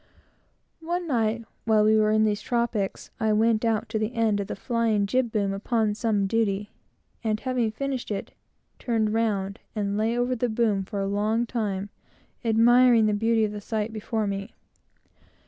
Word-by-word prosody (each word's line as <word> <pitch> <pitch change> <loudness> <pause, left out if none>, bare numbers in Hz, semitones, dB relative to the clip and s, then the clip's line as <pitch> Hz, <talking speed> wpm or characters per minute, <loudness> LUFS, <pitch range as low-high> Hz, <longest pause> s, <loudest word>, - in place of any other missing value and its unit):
One 345 +2 -3
night, 230 -5 0 0.2
while 220 -1 +4
we 215 +1 +4
were 215 0 +3
in 215 0 +3
these 210 -1 +1
tropics, 235 -5 -2
I 220 -1 +2
went 220 +1 +2
out 225 -2 0
to 220 -1 -1
the 220 +3 -2
end 220 -3 +2
of 200 - -3
the - - -4
flying 225 -2 0
jib 240 +3 0
boom, 200 -3 0
upon 215 +1 0
some 210 -2 0
duty, 205 -1 0 0.5
and, 215 -1 0
having 255 -3 0
finished 270 +2 -4
it, 205 -2 -4 0.5
turned 220 -3 0
round, 200 -4 -1 0.2
and 205 -1 -1
lay 225 +2 +1
over 245 +1 +1
the 245 0 -1
boom 220 -4 +1
for 200 +1 -4
a - - -1
long 215 +4 0
time, 205 -4 -3 0.5
admiring 235 +1 +5
the 210 - +2
beauty 225 +1 +2
of 210 - -3
the 210 0 -6
sight 220 +1 -3
before 220 0 -2
me. 200 0 -4
220 Hz, 175 wpm, -26 LUFS, 210-230 Hz, 0.5 s, admiring